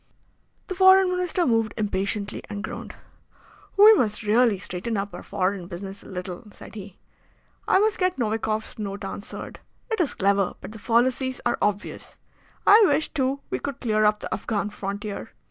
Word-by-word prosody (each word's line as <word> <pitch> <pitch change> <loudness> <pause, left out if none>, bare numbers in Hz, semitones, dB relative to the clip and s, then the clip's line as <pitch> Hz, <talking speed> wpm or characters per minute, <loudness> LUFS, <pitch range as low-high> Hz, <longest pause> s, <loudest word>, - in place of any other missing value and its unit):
The 375 - -4
Foreign 375 0 +6
Minister 360 -1 0
moved 225 -3 +1
impatiently 200 0 -2
and 205 -1 -5
groaned. - - -7 0.8
"We 425 +2 +10
must 220 - +1
really 220 0 +3
straighten 195 +4 -4
up 200 +1 -3
our - - -7
foreign 190 -2 -2
business 195 +2 -7
a - - -14
little," 180 +3 -7
said - - -13
he. 200 -3 -9 0.7
"I - - +5
must 425 +1 +2
get 365 -1 +1
Novikoff's 220 -2 -2
Note 200 -1 -4
answered. 200 +2 -7 0.3
It 445 - +1
is 310 - -1
clever, 200 -1 +1
but - - -9
the 220 - -10
fallacies 255 +3 +1
are 240 - +1
obvious. 205 0 -2 0.5
I 430 +2 +8
wish, 295 0 +1
too, 275 -1 0
we - - -1
could 280 -3 -5
clear 215 -3 +1
up 210 0 +3
the - - -4
Afghan 210 -1 -2
frontier. 200 0 -5
215 Hz, 165 wpm, -25 LUFS, 200-265 Hz, 0.8 s, We